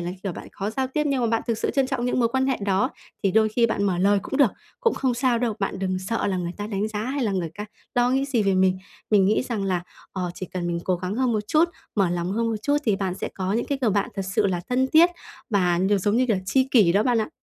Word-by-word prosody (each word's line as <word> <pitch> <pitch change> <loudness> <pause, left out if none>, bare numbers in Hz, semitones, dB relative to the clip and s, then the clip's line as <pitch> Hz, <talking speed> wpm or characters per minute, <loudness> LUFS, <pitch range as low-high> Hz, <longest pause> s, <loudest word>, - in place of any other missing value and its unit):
là, 175 +1 -3
kiểu, 195 -3 -3
bạn - - -9
khó 200 +2 -3
giao 260 +3 -1
tiếp 300 +3 -1
nhưng 275 -3 +1
mà 235 - +2
bạn 225 0 0
thực 230 -2 -1
sự - - 0
trân 270 -2 +1
trọng 260 -2 -2
những 250 - 0
mối 230 - +3
quan 265 +2 0
hệ 265 - +1
đó, 200 -1 +1 0.3
thì 195 - +2
đôi 220 +2 +4
khi 230 +2 +2
bạn 205 -2 -1
mở 180 -3 +1
lời 200 +2 +4
cũng 270 - -4
được, 275 -7 +5 0.3
cũng 460 -3 +2
không 255 -3 0
sao 245 -1 +1
đâu, 230 -3 0
bạn 195 -1 -2
đừng 185 -1 -1
sợ 210 +5 -2
là 190 -2 0
người 175 -1 -3
ta 205 0 -4
đánh 210 0 -2
giá 210 -1 -4
hay 265 0 -1
là 205 - 0
người 175 -4 -2
ca 210 - -5 0.3
lo 245 0 +3
nghĩ 270 +1 +1
gì 250 -6 0
về 195 -1 +2
mình. 185 0 +3 0.3
Mình 200 -3 +5
nghĩ 210 +5 +2
rằng 225 -6 -3
là, 180 -2 0 0.3
ờ, 180 -2 -3
chỉ 185 - -6
cần 175 0 -4
mình 170 0 -2
cố 185 -1 +1
gắng 185 +3 -4
hơn 255 -1 +1
một 210 -1 -2
chút, 315 +2 +4 0.3
mở 195 -4 +2
lòng 175 +1 -2
hơn 230 +2 0
một 220 - -1
chút 290 0 +2
thì 210 -4 +2
bạn 190 -2 -2
sẽ - - -4
có 190 0 -2
những 230 - 0
cái 280 -1 -2
người 230 -4 +2
bạn 200 0 0
thật 195 - -2
sự 215 -3 +3
là 180 -2 -1
thân 260 +1 +2
thiết 340 +3 +7 0.4
và 180 -4 +2
nh 190 - +1
giống 205 +4 +1
như 255 - +3
kiểu, 220 -5 +1
tri 260 +6 +2
kỷ 220 -8 +5
đó 205 +2 +3
bạn 245 -2 +2
ạ. 215 - -2
210 Hz, 305 wpm, -24 LUFS, 190-245 Hz, 0.4 s, thiết